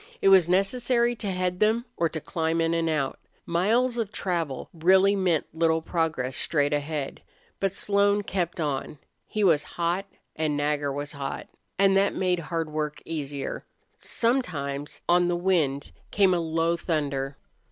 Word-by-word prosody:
It 195 - +4
was 185 -3 +6
necessary 235 +5 +2
to 205 - -4
head 180 -1 -1
them 220 +3 +2
or 165 - +1
to 160 - -4
climb 160 +1 -1
in 165 0 +1
and 165 -1 +1
out. 145 -4 -1 0.3
Miles 230 +8 +1
of 215 -3 -2
travel 170 -10 -2
really 190 +4 +4
meant 180 -5 +1
little 160 0 +1
progress 155 -7 -1
straight 145 -2 +1
ahead. 145 -1 -3 0.4
But 195 0 0
Slone 200 0 +2
kept 180 -3 -2
on. 150 -1 -2 0.3
He 215 - -1
was 165 -6 +5 0.2
hot 175 +3 0 0.3
and 155 -2 0
Nagger 145 -1 0
was 145 +1 -4
hot, 140 -2 -5 0.3
and 195 0 +4
that 200 +1 +2
made 180 -2 +1
hard 165 0 -3
work 150 -1 -3
easier. 145 -4 -4 0.4
Sometimes 150 - -2
on 175 0 +4
the 175 0 0
wind 155 - 0 0.2
came 195 -2 +4
a 175 - +1
low 165 +1 +1
thunder. 140 -5 -2
170 Hz, 155 wpm, -26 LUFS, 150-195 Hz, 0.4 s, was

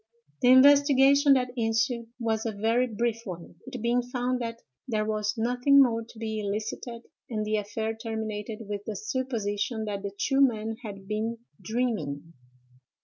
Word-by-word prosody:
"The - - +3
investigation 280 +1 +6
that 250 -2 +1
ensued 235 0 0
was 220 -2 0
a 225 - -1
very 225 +5 +1
brief 230 0 -1
one, 175 -4 -8
it 250 - -6
being 240 +1 +2
found 250 0 -2
that 230 0 -4 0.3
there 215 -3 0
was 215 0 -1
nothing 250 +5 +4
more 230 -4 +4
to 225 - -16
be 220 -1 -3
elicited; 220 +3 -4 0.3
and 215 -3 -2
the 215 0 0
affair 220 +2 -3
terminated 220 -1 -5
with 205 -1 -4
the 215 - -4
supposition 220 -1 -2
that 200 -2 -3
the 200 - -3
two 270 +7 0
men 225 -4 +1
had 200 -4 -8
been 220 +2 -2 0.2
dreaming. 195 - -2
225 Hz, 155 wpm, -27 LUFS, 215-245 Hz, 0.3 s, investigation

